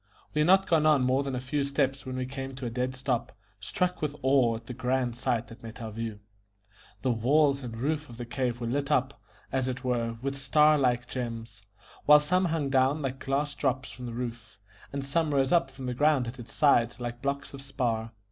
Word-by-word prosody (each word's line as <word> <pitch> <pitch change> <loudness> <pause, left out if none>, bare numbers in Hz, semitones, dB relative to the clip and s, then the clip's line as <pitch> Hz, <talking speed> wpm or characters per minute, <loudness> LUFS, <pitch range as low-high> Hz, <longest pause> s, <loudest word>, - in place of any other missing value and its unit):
We 150 - 0
had 150 - +3
not 190 +1 +6
gone 155 -2 +3
on 150 -4 +5
more 130 +2 +2
than 135 -2 -3
a - - -1
few 135 +3 -1
steps 140 -1 -1
when 130 - -4
we 130 0 -2
came 135 0 -6
to 130 0 -6
a 120 - -3
dead 125 +2 -2
stop, 130 -2 -2 0.3
struck 180 - -1
with 150 -1 -2
awe 130 -4 +4
at 115 +1 -9
the 125 - -6
grand 125 0 -1
sight 120 -1 -1
that 115 +2 -12
met 115 +1 -9
our 110 -2 -5
view. 110 -1 -5 0.8
The 130 - +2
walls 140 +4 +3
and 115 -3 -6
roof 150 +4 -1
of 120 - -10
the 120 - -5
cave 120 0 -2
were 120 - -3
lit 140 +4 -1
up, 130 -2 +1 0.3
as 130 -1 0
it 130 +1 -4
were, 115 -2 -1
with 140 0 -2
star 150 +2 +5
like 125 -2 +1
gems, 115 -4 -5 0.5
while 150 0 +9
some 180 +5 +1
hung 160 -5 -1
down 135 +3 +3
like 135 0 -3
glass 145 +2 0
drops 130 -2 -1
from 125 -1 -8
the 120 - -6
roof, 115 -4 -6 0.3
and 140 -1 -3
some 150 +1 0
rose 135 -1 +2
up 170 -6 +3
from 135 -1 -9
the 125 - -2
ground 145 -1 +3
at 125 +3 -7
its 115 -1 -9
sides 135 -6 +3
like 120 0 -5
blocks 140 +1 -3
of 135 - -7
spar. 120 -5 -2
130 Hz, 225 wpm, -28 LUFS, 120-140 Hz, 0.8 s, while